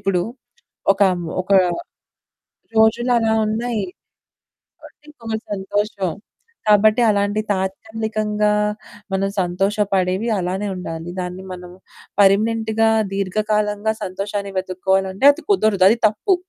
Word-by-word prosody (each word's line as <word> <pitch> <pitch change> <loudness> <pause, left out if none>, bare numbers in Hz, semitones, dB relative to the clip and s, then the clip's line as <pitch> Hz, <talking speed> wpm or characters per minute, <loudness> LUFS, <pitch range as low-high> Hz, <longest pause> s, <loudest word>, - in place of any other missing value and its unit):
ఇప్పుడు 185 -3 0 0.7
ఒకం 195 -2 +2 0.3
ఒక 190 - -6 1.3
రోజులలా 225 +1 +3
ఉన్నాయి. 220 0 -1 1.0
కొట్టి - - -16
ఇంకొక 230 -6 -5 0.2
సంతోషం. 200 -1 -2 0.6
కాబట్టి 215 +3 +5
అలాంటి 205 0 +1
తాత్కాలికంగా 210 +2 -1 0.6
మనం 195 +1 0
సంతోషపడేవి 195 +2 0
అలానే 185 +3 -2
ఉండాలి. 165 -2 -6
దాన్ని 180 +1 -5
మనం 180 -1 -10 0.5
పర్మనెంట్‌గా‌ 220 +2 +3 0.2
దీర్ఘకాలంగా 210 +2 0
సంతోషాన్ని 200 +2 -4
వెతుక్కోవాలంటే 190 +3 0
అది 330 +4 -9
కుదరదు. 215 - +3
అది 225 - +3
తప్పు. 220 - +1
205 Hz, 90 wpm, -20 LUFS, 190-220 Hz, 1.3 s, కాబట్టి